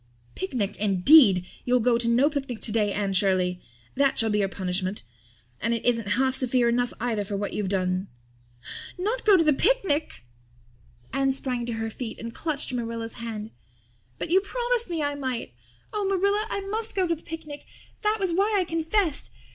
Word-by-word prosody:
"Picnic, 200 - -2
indeed! 200 - +6 0.2
You'll 250 0 +2
go 235 0 +2
to 235 - 0
no 240 +4 +4
picnic 275 -6 -3
today, 210 -2 +1
Anne 200 -1 -1
Shirley. 185 -2 +1 0.3
That 275 0 +2
shall 225 -1 +2
be 210 - +1
your 200 - +2
punishment. 185 +1 -2 0.6
And 230 +1 0
it 230 - -4
isn't 230 -4 +1
half 260 0 +2
severe 255 -2 +2
enough 245 +1 +1
either 225 -3 -1
for 200 0 -4
what 205 +1 -3
you've 205 -3 -2
done!" 185 0 0 0.9
"Not 430 +7 -2
go 405 -3 +8
to 330 - +4
the 305 -1 +4
picnic!" 335 - +1 0.9
Anne 270 0 +2
sprang 250 -3 -3
to 235 - -2
her 225 0 -3
feet 230 0 -6
and 230 0 -7
clutched 295 -3 -3
Marilla's 230 -1 -4
hand. 220 -2 -5 0.7
"But - - -5
you 380 +2 +5
promised 480 +1 -1
me 330 -3 -1
I 290 0 0
might! 260 - -4 0.4
Oh, 415 -2 -1
Marilla, 400 +2 +1
I 400 - -2
must 435 +3 -1
go 380 -2 +2
to 335 - +1
the 320 - -15
picnic. 310 -3 -8 0.3
That 425 0 +1
was 380 -3 0
why 405 +4 +2
I - - +2
confessed. 325 - 0
250 Hz, 180 wpm, -26 LUFS, 210-330 Hz, 0.9 s, go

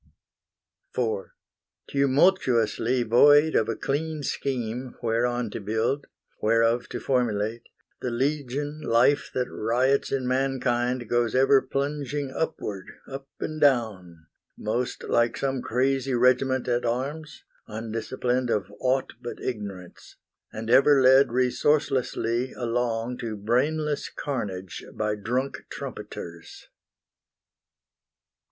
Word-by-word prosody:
IV 110 -6 0 0.6
Tumultuously 130 - +2
void 145 +7 +6
of 110 - +2
a 115 - -1
clean 155 +2 -2
scheme 125 -2 -3
Whereon 120 0 0
to - - -5
build, 110 +7 -1 0.3
whereof 115 +2 +2
to 120 - -4
formulate, 115 -3 -1 0.3
The 125 - -2
legion 145 +3 -2
life 120 +4 +3
that 125 -1 0
riots 125 +5 +1
in 130 -2 -1
mankind 125 -2 0
Goes 120 0 +1
ever 135 +1 +5
plunging 140 0 -3
upward, 105 -12 -3 0.2
up 135 0 -7
and 155 0 -4
down, 100 - +1 0.3
Most 120 +4 -2
like 120 0 +1
some 135 -2 -1
crazy 130 +2 0
regiment 125 +1 +2
at 120 0 +1
arms, 140 +6 -3 0.2
Undisciplined 115 +3 -2
of 105 -2 -1
aught 130 +1 0
but 120 - -6
Ignorance, 100 -7 -7 0.4
And 110 +1 -4
ever 140 +2 +6
led 130 0 +6
resourcelessly 125 -1 +1
along 120 0 -2
To 110 -2 -4
brainless 145 +8 0
carnage 100 -10 -5
by 105 -1 0
drunk 125 +6 -2
trumpeters. 85 -1 -8
125 Hz, 105 wpm, -26 LUFS, 115-135 Hz, 0.6 s, void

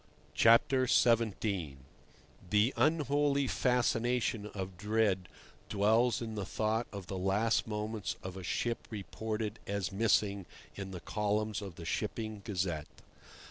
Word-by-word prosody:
XVII. 115 - +3 0.7
The 105 +5 +3
unholy 145 -2 +2
fascination 120 -3 +1
of 95 -3 -6
dread 105 -2 +1 0.4
dwells 110 +3 +3
in 110 -1 -5
the 105 -2 -3
thought 110 +4 -1
of 100 -3 -7
the 95 +1 -4
last 100 +6 +1
moments 105 0 -3
of 95 0 -6
a 95 - -6
ship 115 +5 -2
reported 110 +1 -4
as 100 -2 -2
"missing" 100 -2 +1 0.3
in 100 -1 -6
the 90 -2 -7
columns 105 0 -1
of 95 -4 -7
the 85 - -9
Shipping 110 +5 -3
Gazette. 90 -8 -3
105 Hz, 120 wpm, -32 LUFS, 95-115 Hz, 0.7 s, XVII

